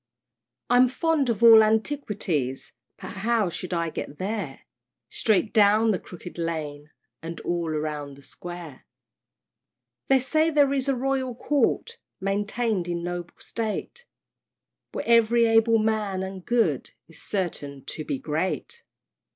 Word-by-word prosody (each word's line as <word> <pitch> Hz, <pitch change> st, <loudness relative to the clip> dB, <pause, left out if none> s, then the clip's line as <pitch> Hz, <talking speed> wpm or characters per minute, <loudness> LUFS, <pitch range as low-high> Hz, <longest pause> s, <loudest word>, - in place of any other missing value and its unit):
I'm 245 Hz, +1 st, +5 dB
fond 290 Hz, +1 st, +1 dB
of 230 Hz, -1 st, -1 dB
all 225 Hz, -1 st, +10 dB
antiquities, 215 Hz, -, -1 dB, 0.3 s
But -, -, -8 dB
how 220 Hz, -1 st, +1 dB
shall 180 Hz, +1 st, -4 dB
I 170 Hz, -1 st, -1 dB
get 145 Hz, -, -6 dB
there? 190 Hz, -7 st, -4 dB, 0.5 s
"Straight 215 Hz, 0 st, +1 dB
down 215 Hz, +1 st, +5 dB
the 185 Hz, -, 0 dB
Crooked 175 Hz, -1 st, -10 dB
Lane, 150 Hz, -3 st, -4 dB, 0.3 s
And 165 Hz, +1 st, -6 dB
all 170 Hz, -1 st, -2 dB
round 150 Hz, -2 st, -3 dB
the 140 Hz, -, -16 dB
Square." 175 Hz, -3 st, -9 dB, 1.2 s
They 270 Hz, -, +5 dB
say 310 Hz, +5 st, +2 dB
there 290 Hz, -3 st, +3 dB
is 275 Hz, 0 st, -1 dB
a 270 Hz, -, +2 dB
Royal 260 Hz, -1 st, -1 dB
Court 295 Hz, -, 0 dB, 0.2 s
Maintain'd 205 Hz, 0 st, -1 dB
in 170 Hz, -1 st, -3 dB
noble 175 Hz, 0 st, -5 dB
state, 230 Hz, -, -4 dB, 0.9 s
Where -, -, -5 dB
ev'ry 235 Hz, 0 st, +5 dB
able 225 Hz, 0 st, +4 dB
man, 215 Hz, -3 st, 0 dB
and 190 Hz, -1 st, -6 dB
good, 220 Hz, -, +1 dB, 0.2 s
Is 165 Hz, -, -10 dB
certain 145 Hz, -8 st, -4 dB
to 155 Hz, -, -5 dB
be 145 Hz, -2 st, -2 dB
great! 165 Hz, -, -3 dB
205 Hz, 135 wpm, -25 LUFS, 170-235 Hz, 1.2 s, all